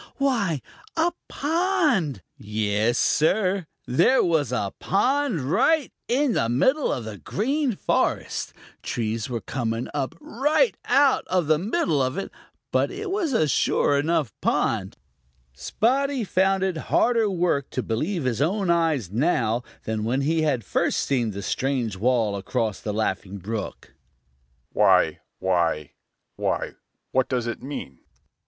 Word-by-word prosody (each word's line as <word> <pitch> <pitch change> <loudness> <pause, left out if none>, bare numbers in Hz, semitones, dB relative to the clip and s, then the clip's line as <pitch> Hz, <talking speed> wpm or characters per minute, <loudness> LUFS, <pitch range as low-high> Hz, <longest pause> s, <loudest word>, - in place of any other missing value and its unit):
Why, 225 - +1 0.4
a 330 +2 +3 0.2
pond! 300 - +1
Yes, 105 +2 0
Sir, 185 +2 +2 0.2
there 170 - +4
was 155 -7 +1
a 100 -6 -1
pond 255 - +1
right 275 - +2
in 260 +1 +2
the 115 - +1
middle 260 - +2
of 120 - -3
the 105 -3 -7
Green 255 - -1
Forest! - - -1 0.3
Trees 115 0 -2
were 120 -2 -3
coming 115 -2 -3
up 145 +2 -2
right 300 - +1
out 275 -1 +4
of 180 -3 +1
the 155 0 +3
middle 185 - 0
of 130 +1 -1
it, 195 - -4 0.4
but - - +2
it 390 +1 -5
was 380 -6 0
a 160 -11 +2
sure 140 0 +2
enough 150 -5 0
pond. - - 0 0.6
Spotty 260 - 0
found 190 0 +2
it 190 -3 0
harder 230 -3 +3
work 175 -7 0
to 130 - -3
believe 155 - -2
his 125 -1 -1
own 185 +3 +1
eyes 160 - +1
now 120 - +1 0.2
than 110 -1 -2
when 125 +5 0
he 160 +3 +1
had 140 -7 +1
first - - 0
seen 125 -5 0
the 100 -1 -6
strange 125 -3 -1
wall 110 0 +1
across 100 +2 -2
the 105 - -4
Laughing 100 -2 -2
Brook. 105 +3 -6 0.8
"Why, - - +4 0.2
why, 85 -5 0 0.5
why, - - -1 0.4
what 130 0 +1
does 125 -3 -1
it 120 - -4
mean?" 130 - -7
150 Hz, 140 wpm, -24 LUFS, -, 0.8 s, there